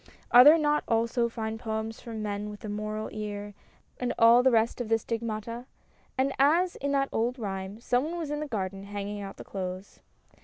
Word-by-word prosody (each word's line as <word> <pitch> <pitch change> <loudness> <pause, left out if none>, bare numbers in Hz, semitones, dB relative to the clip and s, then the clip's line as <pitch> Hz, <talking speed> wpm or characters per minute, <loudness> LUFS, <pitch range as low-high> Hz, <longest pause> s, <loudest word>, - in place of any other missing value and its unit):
(Are 245 +1 +10
there 300 +4 +9
not 300 -1 +1
also 235 +1 +1
fine 225 -1 -4
poems 220 -1 -4
from 225 -2 -6
men 205 0 -3
with 210 0 -9
the 215 - -6
morel 215 +1 -3
ear 205 -1 -5 0.5
and 250 -1 -1
all 230 +2 +7
the 260 - +5
rest 230 0 +2
of 230 - -4
the 225 - +4
stigmata? 230 +1 -4 0.2
) - - -36
And, 270 +1 +1
as 335 +6 +4
in 280 +1 -2
that 275 -1 +1
old 240 +3 0
rhyme, 195 -2 -5
someone 260 +8 0
was 320 -4 -4
in 295 - -2
the 305 - -4
garden 195 -5 -4
hanging 205 0 -5
out 195 -1 -8
the - - -8
clothes. 185 0 -6
225 Hz, 200 wpm, -28 LUFS, 210-250 Hz, 0.5 s, Are